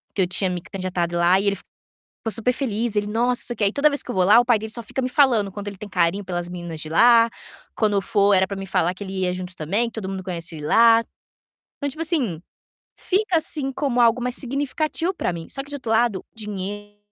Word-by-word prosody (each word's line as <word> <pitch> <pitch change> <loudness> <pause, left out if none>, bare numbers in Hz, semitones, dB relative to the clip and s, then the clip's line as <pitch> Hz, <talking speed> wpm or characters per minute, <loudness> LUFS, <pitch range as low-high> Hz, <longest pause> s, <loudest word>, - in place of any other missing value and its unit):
que 195 - +1
eu 180 - +2
tinha 185 +1 +2
me 180 -1 -3
candidatado 180 -2 -3
lá 175 +2 +4
e 200 - -1
ele, 200 - +2 0.5
ficou 225 - -7
super 235 +3 +1
feliz, 235 -3 -2
"Nossa, 205 0 0 0.3
não - - -5
sei 240 - -2
o - - -19
que" 210 - +2
e 200 - +1
toda 285 +4 +4
vez 285 - 0
que - - -9
eu - - -3
vou 185 -1 +3
lá 205 +5 +7
o - - +1
pai 240 -2 +3
dele 220 +1 -6
só 235 - -4
fica 230 - -4
me 255 - 0
falando, 250 -7 +3
quando 205 +1 -6
ele 200 -2 -8
tem 210 - -8
carinho 180 +1 +1
pelas 175 -1 -4
meninas 175 -2 -6
de 155 - -5
lá, 230 +6 +6 0.5
quando 215 -2 +1
eu 200 - +1
for 200 +2 +3
era 190 0 +4
para 200 - -5
me 195 - -6
falar 175 -1 +1
que 185 - -10
ele 190 - -7
ia 180 -1 0
junto 180 0 -6
também, 195 +10 0
que - - -34
todo 220 -4 -5
mundo 190 -1 -4
conhecia 170 -3 -3
ele 150 - -6
lá. 230 +5 +6 0.8
Então 285 - -3
tipo 310 +4 -6
assim, 270 - -1 0.5
fica 380 -1 0
assim 300 -3 -2
como 260 -3 -1
algo 235 +1 +4
mais 250 0 -1
significativo 295 +6 -1
para 180 - -2
mim, 165 -1 -7
só 270 - -3
que 280 - -16
do - - -7
outro 250 -5 -4
lado, 225 -4 +1
dinheiro 205 -1 -6
205 Hz, 255 wpm, -22 LUFS, 185-245 Hz, 0.8 s, lá